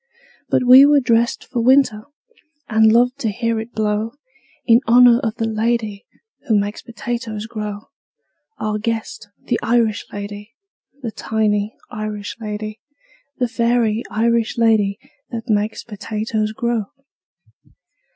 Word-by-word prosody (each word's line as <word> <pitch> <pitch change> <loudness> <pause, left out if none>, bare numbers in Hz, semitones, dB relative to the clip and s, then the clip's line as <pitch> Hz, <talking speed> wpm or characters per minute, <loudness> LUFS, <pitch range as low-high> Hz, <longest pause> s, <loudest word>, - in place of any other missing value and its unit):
But - - +2
we 255 +2 +9
were 290 0 +6
dressed 235 -2 +1
for 245 -3 -3
winter, 245 -4 +3 0.6
And 220 -1 +4
loved 245 +4 +3
to 230 - -1
hear 230 +2 -1
it 225 +2 -8
blow 215 +1 -1 0.5
In 230 +1 +5
honor 240 0 +7
of 225 -4 -2
the 225 - -2
lady 220 -2 -2 0.4
Who 220 -4 +3
makes 205 +1 -3
potatoes 235 -1 -5
grow 210 -2 -6 0.7
Our 215 0 -2
guest, 220 -1 -4
the 235 - -1
Irish 225 -2 +1
lady, 205 +3 -8 0.5
The 230 - -3
tiny 215 -1 -1 0.2
Irish 215 -1 -5
lady, 215 0 -5 0.6
The 250 - 0
fairy 235 -2 +1
Irish 230 +2 0
lady 215 -3 +2 0.3
That 230 0 -6
makes 210 0 0
potatoes 215 0 -3
grow. 235 -2 -1
225 Hz, 125 wpm, -20 LUFS, 215-235 Hz, 0.7 s, we